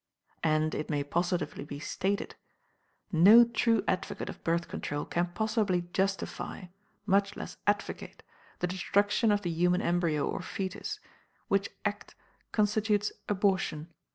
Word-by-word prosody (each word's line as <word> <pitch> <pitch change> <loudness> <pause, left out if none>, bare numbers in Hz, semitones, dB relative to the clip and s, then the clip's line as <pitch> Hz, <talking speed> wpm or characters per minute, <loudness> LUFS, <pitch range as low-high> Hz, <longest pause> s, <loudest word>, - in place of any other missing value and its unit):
And, 155 0 +2
it 150 - -3
may 145 -2 0
positively 175 +2 -1
be 145 0 -7
stated, 195 +6 -2 0.8
no 200 +8 +8
true 230 -1 +2
advocate 185 - -2
of - - -9
Birth 170 +1 0
Control 145 0 -4
can 175 +1 0
possibly 205 -1 0
justify, 195 0 -2 0.4
much 200 0 +2
less - - -7
advocate, 205 -1 -2 0.4
the - - +2
destruction 205 +4 +2
of 205 0 +1
the 175 - -1
human 180 +2 +2
embryo 170 -4 +1
or - - -3
foetus, 195 - -4 0.5
which - - +2 0.2
act - - -3 0.4
constitutes 210 -1 +1 0.2
abortion. 190 -5 0
185 Hz, 125 wpm, -30 LUFS, 170-205 Hz, 0.8 s, no